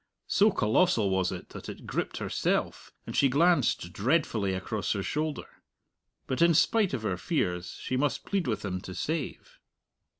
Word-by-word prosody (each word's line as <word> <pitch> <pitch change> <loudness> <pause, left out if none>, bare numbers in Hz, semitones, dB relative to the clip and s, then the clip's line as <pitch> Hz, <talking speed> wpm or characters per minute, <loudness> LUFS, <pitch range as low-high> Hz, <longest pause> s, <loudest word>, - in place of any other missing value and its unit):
So 210 +2 +4
colossal 110 - +2
was 95 -1 +1
it - - -7
that - - -9
it - - -9
gripped - - -3
herself, - - -1
and - - -6
she 140 - +4
glanced 140 - +2
dreadfully 110 - +1
across 100 +3 -2
her 100 -2 -2
shoulder. 155 +4 -4 0.6
But 130 - -2
in 170 -1 +5
spite 200 0 +3
of 115 - -5
her 95 -4 -1
fears 90 - -2
she 130 - -2
must 145 +1 0
plead 195 -6 -1
with 105 -3 -2
him 95 -2 -3
to 95 - -8
save. 155 - -4
125 Hz, 165 wpm, -29 LUFS, 95-165 Hz, 0.6 s, in